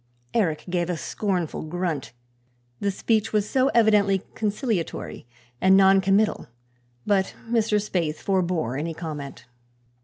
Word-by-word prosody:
Eric 170 -9 0
gave 175 -1 -1
a 175 - -1
scornful 175 - -2
grunt, 165 -2 -3 0.7
the 200 - 0
speech 215 +2 0
was 210 -1 +1
so 265 +2 +2
evidently 205 -4 +4
conciliatory 210 - -3 0.3
and 190 +1 +6
noncommittal, 195 +2 +3 0.6
but 195 -2 +1
Mr. 225 -2 +2
Spaythe 175 -7 -1
forbore 175 -10 -1
any 165 +1 -3
comment. 150 -7 -7
190 Hz, 115 wpm, -24 LUFS, 165-210 Hz, 0.7 s, and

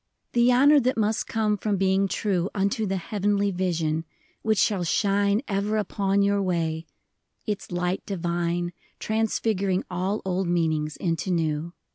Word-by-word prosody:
The 240 +1 +4
honor 285 +4 +6
that 255 -1 0
must 215 0 0
come 215 -2 0
from 205 0 -1
being 190 +1 +2
true 190 -2 -1
Unto 200 +2 0
the 195 0 -1
Heavenly 205 +1 0
Vision, 165 -4 -1 0.2
— - - -37
which 220 -1 +1
shall 195 -2 +2
shine 200 - +2
Ever 205 +1 0
upon 200 -1 +1
your 200 0 +2
way, 165 -3 -1 0.3
— - - -48
its 210 -4 -4
light 175 +1 -1
divine 175 -1 -1 0.2
Transfiguring 215 -3 0
all 190 +4 -1
old 185 0 -1
meanings 160 -3 0
into 165 +1 -2
new. 165 -1 -1
195 Hz, 150 wpm, -25 LUFS, 175-210 Hz, 0.3 s, honor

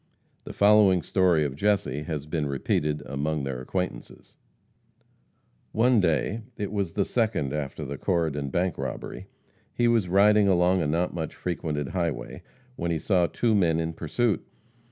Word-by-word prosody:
The - - -7
following 100 -4 +5
story 90 -5 +2
of 70 -2 -3
Jesse 100 -6 0
has 75 -2 -4
been 75 -1 -2
repeated 75 +2 -1
among 70 +3 -2
their 65 -2 -4
acquaintances: 90 -3 -5 1.4
One 120 +1 +4
day 90 - 0 0.2
it 100 -2 -3
was 100 -5 -2
the 100 - +1
second 105 - 0
after 75 0 -4
the 70 0 -6
Corydon 80 -6 -1
bank 90 +5 -1
robbery - - -5 0.4
he 120 - +1
was 115 -6 +2
riding 105 +2 +5
along 90 0 +3
a 80 - 0
not 85 +4 0
much 80 -3 -4
frequented 75 -5 -3
highway, 85 -10 -3 0.4
when 85 - -2
he 85 - 0
saw 90 +2 +2
two 115 +4 0
men 85 -6 +2
in 80 0 -2
pursuit. 100 +8 -1
85 Hz, 155 wpm, -26 LUFS, 75-100 Hz, 1.4 s, following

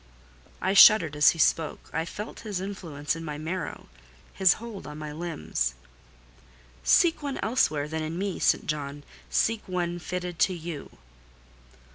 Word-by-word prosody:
I 190 - +2
shuddered 200 -7 +8
as 150 -2 +6
he - - -1
spoke: 160 -1 0
I 160 - -1
felt 210 +5 -7
his 210 -5 -4
influence 170 -7 -4
in 165 - -7
my 150 -2 -5
marrow—his 65 - -2
hold 225 -3 -9
on 150 0 -8
my 155 -1 -6
limbs. 160 - -3 1.1
"Seek 330 - +4
one 280 -2 -3
elsewhere 155 - +1
than 160 +1 -3
in 155 +2 -4
me, 195 0 -2
St. - - +2
John: 145 -1 -4 0.3
seek 225 -1 +1
one 175 -1 -2
fitted 180 -1 -5
to 185 +3 +3
you." 165 -3 -8
165 Hz, 145 wpm, -27 LUFS, 150-190 Hz, 1.1 s, shuddered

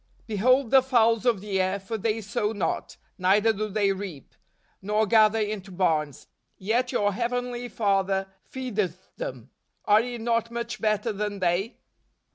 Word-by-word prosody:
" - - -34
Behold 240 +4 +2
the 265 -1 +7
fowls 235 -2 +2
of 225 -6 +2
the 195 -2 -1
air: 190 +2 0
for 195 +4 -5
they 220 +1 -1
sow 210 +1 -2
not, 205 - -3 0.2
neither 205 +5 +4
do 215 +1 -3
they 200 -1 +1
reap, 190 -8 -7 0.5
nor 210 +2 +1
gather 215 0 +4
into 210 -2 -3
barns; 160 -6 -1 0.3
yet 235 +6 0
your 205 0 +1
Heavenly 245 +2 -2
Father 195 -3 +1 0.3
fcedeth 210 -9 -3
them. - - -6 0.3
Are 210 +1 +5
ye 245 0 -5
not 230 0 0
much 235 +1 -5
better 215 +1 0
than 205 0 -3
they 185 +5 0
215 Hz, 155 wpm, -26 LUFS, 195-235 Hz, 0.5 s, the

